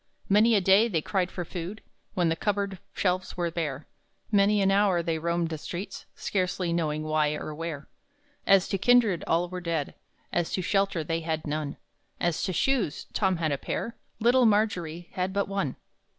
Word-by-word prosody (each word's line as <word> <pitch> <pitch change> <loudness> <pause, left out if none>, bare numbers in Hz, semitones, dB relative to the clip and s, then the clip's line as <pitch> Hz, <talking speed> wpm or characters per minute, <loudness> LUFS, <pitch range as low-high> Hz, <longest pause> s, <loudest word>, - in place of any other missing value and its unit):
Many 215 +3 +5
a 200 - +4
day 195 +5 +5
they 165 -9 -1
cried 185 -3 0
for 175 -2 -5
food 180 +5 -6 0.3
When 175 -3 +2
the 165 - +1
cup 205 +4 0
board 200 -2 -3
shelves 185 -1 -1
were 170 -1 0
bare; 155 -4 -3 0.5
Many 205 0 +4
an 195 0 +3
hour 195 -3 +3
they 165 -1 -1
roamed 170 0 0
the 160 -2 -4
streets 180 +6 -6
Scarcely 180 -2 -1
knowing 155 -2 -1
why 155 -1 +1
or 155 - -5
where. 155 -2 -5 0.6
As 195 -1 +5
to 195 - -1
kindred, 230 -6 +4
all 170 +2 +2
were 180 +1 -6
dead; 165 -4 -2 0.4
As 175 -1 0
to 185 - -1
shelter, 195 -3 +1
they 165 +2 -1
had 160 -1 -3
none; 150 -1 -3 0.4
As 175 -2 0
to - - -1
shoes, 210 - 0
Tom 190 -3 +2
had 160 -2 0
a 140 - -1
pair; 230 - -3 0.2
Little 240 +2 +5
Margery 175 -6 0
had 185 0 -2
but 200 0 0
one! 195 -9 -2
180 Hz, 185 wpm, -27 LUFS, 165-200 Hz, 0.6 s, Many